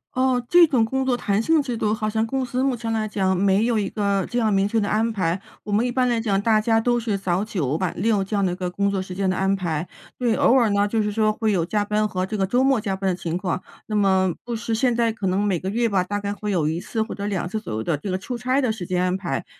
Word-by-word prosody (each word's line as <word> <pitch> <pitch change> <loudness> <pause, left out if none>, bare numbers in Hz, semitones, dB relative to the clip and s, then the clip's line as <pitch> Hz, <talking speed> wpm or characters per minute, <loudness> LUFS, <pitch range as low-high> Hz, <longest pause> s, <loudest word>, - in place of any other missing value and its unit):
哦， 255 -1 +2
这 345 -1 +7
种 260 -7 +2
工 265 +4 -1
作 260 -2 +2
弹 205 -3 0
性 320 +6 +3
制 250 -4 -4
度 210 -1 0
好 215 -1 -2
像 220 +1 0
公 265 +2 -1
司 250 +1 -2
目 265 -1 +1
前 230 -1 -4
来 220 -1 -1
讲 190 -3 0
没 195 +2 +3
有 230 -1 +1
一 200 - -1
个 200 -2 -1
这 245 - -1
样 220 -3 +2
明 195 0 +2
确 225 - -1
的 205 -2 +1
安 220 +2 +1
排。 185 -5 -1 0.2
我 210 - -6
们 210 +4 +2
一 - - 0
般 250 0 +1
来 235 -1 +1
讲， 200 -3 0
大 220 0 +3
家 225 +1 +2
都 240 +1 +1
是 220 -3 -1
早 190 0 -1
9 155 -9 -1
晚 185 -2 -1
6 210 +1 +1
这 195 +2 -3
样 200 -1 +2
的 180 - +1
一 - - -3
个 180 -1 -3
工 200 +2 0
作 195 -1 -1
时 185 -1 -7
间 195 0 0
的 185 - 0
安 195 +1 +2
排。 170 -3 -3 0.3
对， 240 -3 +1
偶 - - +4
尔 245 -4 +4
呢， 200 0 +2
就 220 +2 0
是 210 0 -1
说 215 0 +2
会 215 0 0
有 170 -4 +1
加 205 +3 -1
班 210 +1 +1
和 185 -3 -2
这 215 +3 -4
个 195 - +1
周 245 +7 +1
末 265 -3 +3
加 200 -2 -2
班 190 0 -1
的 180 - 0
情 175 -1 -3
况， 180 -1 -3 0.2
那 215 - -4
么 190 -3 +3
不 240 - -5
时 230 0 -2
现 245 +2 +2
在 230 -1 +1
可 210 -3 -3
能 185 +2 +1
每 200 -3 +1
个 190 - -4
月 230 +3 +1
吧， 195 -4 +1
大 205 +3 -3
概 200 0 -3
会 210 0 -4
有 170 -6 +1
1 160 +3 -2
次 220 +3 -3
或 220 - -3
者 200 - -5
2 190 -4 -2
次 215 +4 -4
左 210 - -6
右 110 - -2
的 150 +6 -1
这 190 +7 -5
个 185 - 0
出 240 +6 -5
差 255 +3 0
的 255 -4 +1
时 190 -5 -6
间 180 0 -1
安 180 0 +1
排， 175 -8 -3
210 Hz, 320 characters per minute, -23 LUFS, 190-230 Hz, 0.3 s, 这